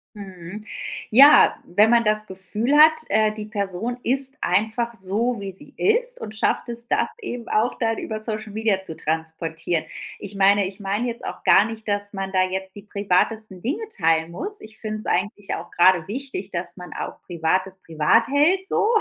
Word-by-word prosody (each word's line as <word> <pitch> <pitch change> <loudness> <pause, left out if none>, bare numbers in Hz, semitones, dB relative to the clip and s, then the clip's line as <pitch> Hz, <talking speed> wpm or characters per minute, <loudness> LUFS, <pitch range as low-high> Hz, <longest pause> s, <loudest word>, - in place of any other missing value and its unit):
Mhm. 195 +1 -9 0.5
Ja, 275 +6 +8
wenn 205 +5 +3
man 235 -1 +5
das 215 0 +1
Gefühl 210 +7 -1
hat, 310 +1 +8 0.2
äh, 215 +1 +3
die 215 -1 -7
Person 210 +2 -3
ist 270 +3 +3
einfach 220 +5 0
so, 215 +4 -1
wie 195 -1 -5
sie 280 +10 -9
ist 485 +4 +1
und 215 - -7
schafft 220 - 0
es, 235 0 -3
das - - +1
eben 245 - -6
auch 220 +3 0
dann 225 -1 0
über 215 -1 -4
Social 215 -1 -4
Media 215 -3 0
zu 160 -4 -5
transportieren. 160 +1 -3 0.3
Ich 200 0 -8
meine 200 0 +4
ich 195 +2 -10
meine 205 +5 -2
jetzt 235 0 -6
auch - - -7
gar 205 - +6
nicht, 225 -1 -8
dass 205 0 -1
man 195 -1 -4
da 185 -1 +2
jetzt 190 0 -4
die 205 - -9
privatesten 200 0 -1
Dinge 390 - -3
teilen 165 -2 +1
muss. 405 - -4
Ich 220 0 -12
finde 215 -1 -4
es - - -7
eigentlich 205 +2 -2
auch - - -6
gerade 180 -1 +4
wichtig, 245 -4 -5
dass 175 -2 -4
man 180 -1 -10
auch - - -6
Privates 185 +3 -1
privat 160 +8 +2
hält 335 +8 +2
so. 415 - +1
210 Hz, 185 wpm, -23 LUFS, 190-235 Hz, 0.5 s, Ja